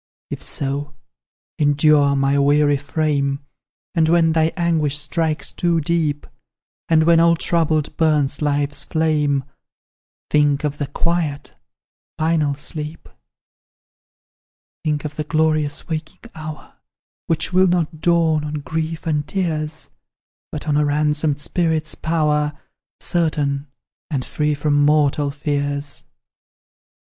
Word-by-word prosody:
"If - - -5
so, 140 +1 -3 0.6
endure, 145 -1 +4
my 140 +1 +2
weary 145 +1 +4
frame; 140 -1 -1 0.5
And 160 -3 +2
when 165 -1 +4
thy 160 0 +2
anguish 160 -4 +1
strikes 155 +1 -1
too 170 -1 +1
deep, 155 -2 0 0.6
And 160 -1 +5
when 165 0 +5
all 170 0 +5
troubled 160 -3 0
burns 150 -3 +2
life's 145 -1 0
flame, 150 -4 +1 0.9
Think 145 -1 +3
of 145 -1 -2
the 145 - -2
quiet, 155 -1 -2 0.6
final 155 -3 +1
sleep; 150 +2 -7 1.7
"Think 150 -2 -1
of 150 -1 -6
the 155 - -1
glorious 155 -2 0
waking 160 +8 -6
hour, 155 -1 -9 0.5
Which 165 +2 -1
will 185 +1 +5
not 170 -3 0
dawn 165 -3 +2
on 150 0 -4
grief 160 +3 -3
and 150 -2 -1
tears, 155 -5 -3 0.6
But 155 +1 -6
on 145 -1 +2
a 150 - +3
ransomed 150 0 +1
spirit's 160 +1 0
power, 150 -2 0 0.4
Certain, 150 -4 0 0.4
and 140 -5 -2
free 150 -1 0
from 145 0 +2
mortal 145 -1 +3
fears. 145 0 -2
150 Hz, 115 wpm, -20 LUFS, 145-160 Hz, 1.7 s, And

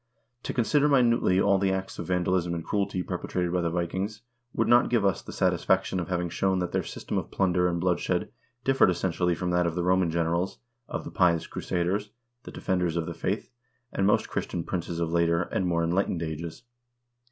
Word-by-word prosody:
To - - -3
consider 145 +5 +2
minutely 120 -8 +4
all 100 0 +4
the 95 0 +2
acts 95 0 -3
of - - -5
vandalism 90 -1 +1
and 80 - -5
cruelty 100 -3 -1
perpetrated 90 -1 -2
by 90 - +1
the 85 - 0
Vikings 95 +6 -3 0.3
would - - 0
not 120 - +7
even - - -4
give 115 -4 +2
us 95 -4 +1
the - - -9
satisfaction 95 - +1
of 85 - -3
having 90 -1 0
shown 95 +3 0
that 90 -1 -2
their - - +1
system - - -4
of - - -7
plunder 90 -2 +2
and 85 -1 -1
blood 90 0 +1
shed - - -1 0.3
differed 135 -6 +4
essentially 90 0 0
from 90 +1 -2
that 90 0 +2
of 85 - -3
the 90 - -1
Roman 90 -1 +3
generals, 85 +3 0 0.3
of - - -4
the - - -8
pious 85 -2 +3
crusaders, 95 +4 -2 0.4
the - - -8
defenders 90 -3 -1
of 85 - -1
the 85 - -5
faith, 100 +9 -3 0.4
and 95 - +1
most 105 - +3
Christian 85 - -3
princes 85 -1 -3
of 85 -1 -1
later, 85 0 +2
and 90 +1 -2
more 85 -1 +1
enlightened, 85 0 0
ages. 80 +6 -5
90 Hz, 205 wpm, -27 LUFS, 85-95 Hz, 0.4 s, not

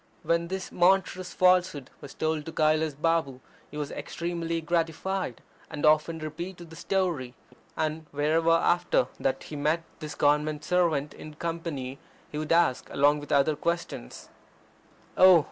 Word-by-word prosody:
When 170 0 +1
this 190 +1 -5
monstrous 185 0 +2
falsehood 180 -7 +2
was 140 - -10
told 155 -1 -1
to - - -4
Kailas 155 -1 +1
Balm 155 -4 0 0.3
he 150 - -9
was 145 -1 -3
extremely 170 -1 -3
gratified, 165 -2 -2 0.3
and 150 -2 -3
often 155 +2 +3
repeated 170 +2 -7
the - - -10
story. 170 -11 -1 0.4
And 155 0 -2
wherever 155 +3 +1
after 165 -5 +3
that 135 0 -1
he 150 - -8
met 155 +3 0 0.2
this 155 -2 -6
Government 150 +1 +1
servant 165 -5 +1
in 155 -1 -11
company 160 -6 -4 0.3
he 150 - -4
would 155 - -4
ask, 165 -6 +2
along 145 +1 +3
with 145 +1 -9
other 145 +1 +3
questions: 170 - -4 0.9
"Oh! 185 -2 +8
160 Hz, 145 wpm, -27 LUFS, 150-170 Hz, 0.9 s, Oh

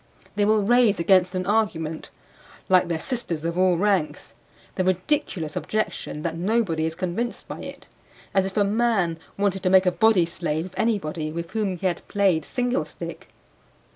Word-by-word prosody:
They 205 0 +2
will 215 0 +3
raise 235 -2 +4
against 185 +1 +3
an 185 0 -1
argument 170 -7 -1 0.6
(like 185 -1 +5
their 165 -2 -2
sisters 175 - -3
of 170 0 -1
all 185 -1 +3
ranks) 170 - 0 0.4
the 185 - -1
ridiculous 185 - -1
objection 215 -7 -3
that 165 -1 -2
nobody 180 -3 0
is 160 - -5
convinced 185 +7 -3
by - - -7
it; - - -9 0.5
as 190 -1 +2
if 195 - -7
a 205 - +5
man 200 -6 +1 0.2
wanted 195 -1 0
to 185 - +1
make 190 0 +6
a 180 - +4
body 215 -3 +4
slave 165 -1 -3
of 185 - -11
anybody 160 -8 -1
with 170 +1 -5
whom 205 -5 -1
he 180 - -7
had 175 -2 -1
played 195 -6 +2
single 250 +1 -1
stick. - - -8
185 Hz, 170 wpm, -24 LUFS, 170-210 Hz, 0.6 s, make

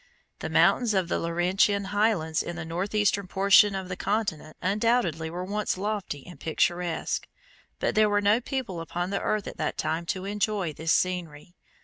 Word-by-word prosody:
The - - -4
mountains 235 -4 +3
of 185 -3 +1
the - - 0
Laurentian 185 +4 +1
highlands 200 -7 +1
in 175 - -5
the 160 -2 -5
northeastern 200 +3 0
portion 195 +2 +5
of 190 -1 -4
the 185 - -4
continent 195 -7 -2
undoubtedly 195 -5 +1
were 175 +2 -5
once 205 0 -1
lofty 195 -8 -3
and 180 - -12
picturesque, 175 +1 -1 0.5
but - - 0
there 215 0 +4
were 205 0 +2
no 205 +4 +3
people 245 - -4
upon 175 +3 -3
the 200 - -1
earth 215 -2 -1
at - - -7
that - - -2
time 160 +2 -2
to 185 +2 -2
enjoy 205 -4 -1
this 160 +2 -2
scenery. 175 -3 -1
190 Hz, 170 wpm, -27 LUFS, 170-205 Hz, 0.5 s, portion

